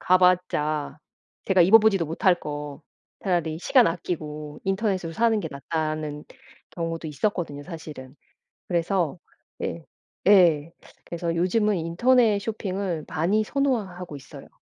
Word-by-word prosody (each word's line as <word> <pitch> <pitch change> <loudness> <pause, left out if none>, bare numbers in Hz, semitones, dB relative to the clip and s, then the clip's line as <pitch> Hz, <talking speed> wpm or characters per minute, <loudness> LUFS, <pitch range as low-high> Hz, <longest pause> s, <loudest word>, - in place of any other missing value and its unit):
가 185 0 +4
봤자 155 -5 +1 0.5
제가 190 -2 +3
입어 205 +6 +8
보지도 210 -5 +3
못할 170 +4 +2
거 145 0 -6 0.4
차라리 170 -4 -1
시간 245 +5 +5
아끼고 150 -3 -4
인터넷으로 190 -4 -1
사는 225 +3 +2
게 180 - -3
낫다는 155 0 -3 0.5
경우도 165 -1 -4
있었거든요 150 -2 -2
사실은. 150 -5 -9 0.5
그래서 175 -1 0 0.4
예 165 -2 -4 0.4
예 170 -5 +5 0.3
그래서 170 0 -3
요즘은 200 +4 +1
인터넷 215 +6 +3
쇼핑을 195 -5 -3
많이 200 +7 +1
선호하고 205 - -2
있어요. 135 - -12
170 Hz, 285 characters per minute, -25 LUFS, 155-195 Hz, 0.5 s, 입어